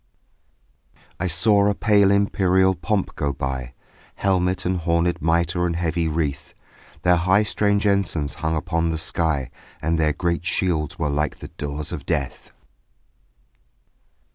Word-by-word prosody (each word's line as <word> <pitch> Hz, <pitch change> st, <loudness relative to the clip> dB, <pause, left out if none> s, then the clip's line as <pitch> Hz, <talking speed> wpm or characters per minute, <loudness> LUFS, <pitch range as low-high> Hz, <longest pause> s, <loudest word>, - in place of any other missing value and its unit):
I 95 Hz, -, -1 dB
saw 100 Hz, +4 st, +3 dB
a 100 Hz, -, 0 dB
pale 100 Hz, -3 st, +4 dB
imperial 95 Hz, -2 st, +3 dB
pomp 95 Hz, +3 st, -2 dB
go 70 Hz, -, -1 dB
by, 65 Hz, -2 st, -4 dB, 0.4 s
Helmet 95 Hz, -1 st, 0 dB
and 90 Hz, 0 st, 0 dB
hornèd 85 Hz, +1 st, 0 dB
mitre 85 Hz, +2 st, +1 dB
and 85 Hz, -, -2 dB
heavy 85 Hz, -1 st, -1 dB
wreath; 75 Hz, -3 st, -3 dB, 0.5 s
Their 90 Hz, 0 st, +4 dB
high 95 Hz, +5 st, +3 dB
strange 105 Hz, -1 st, +1 dB
ensigns 95 Hz, -7 st, 0 dB
hung 80 Hz, 0 st, 0 dB
upon 85 Hz, 0 st, -1 dB
the 80 Hz, -, -1 dB
sky 80 Hz, -5 st, -1 dB, 0.3 s
And 80 Hz, +1 st, 0 dB
their 75 Hz, -1 st, +2 dB
great 85 Hz, 0 st, -1 dB
shields 85 Hz, -4 st, -1 dB
were 75 Hz, -3 st, -1 dB
like 75 Hz, +1 st, -1 dB
the 75 Hz, -, -10 dB
doors 75 Hz, -2 st, -5 dB
of -, -, -6 dB
death. -, -, -3 dB
85 Hz, 140 wpm, -22 LUFS, 80-95 Hz, 0.5 s, pale